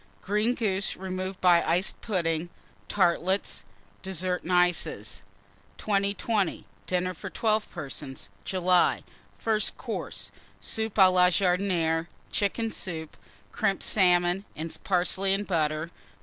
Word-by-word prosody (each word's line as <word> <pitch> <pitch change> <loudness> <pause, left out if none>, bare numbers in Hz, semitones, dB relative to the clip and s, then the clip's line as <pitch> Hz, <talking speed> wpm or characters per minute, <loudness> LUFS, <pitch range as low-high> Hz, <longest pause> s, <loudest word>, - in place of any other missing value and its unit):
Green 210 +5 +1
Goose, 200 -4 -1
removed 185 0 -4
by 175 -2 +6
Creams. - - -2
Iced 180 +4 0
Pudding. 170 -5 -1 0.4
Tartlets. 190 0 +1 0.4
DESSERT 185 -1 -2
AND 180 - -5
ICES. 175 - +1 0.6
2020. 200 -1 0 0.2
DINNER 185 0 0
FOR 165 - -7
12 215 -1 0
PERSONS 140 - -6
(July). 180 -1 +2 0.3
FIRST 215 -2 0
COURSE. - - -5 0.3
Soup 220 0 -1
à 190 -3 +7
la 180 0 +6
Jardinière. 180 -3 +1 0.2
Chicken 220 +3 0
Soup. 160 -6 -5 0.4
Crimped 200 -3 0
Salmon 180 -1 +4
and 160 +1 -4
Parsley 190 +1 +2
and 205 +1 -3
Butter. 155 -2 0
185 Hz, 115 wpm, -27 LUFS, 175-200 Hz, 0.6 s, à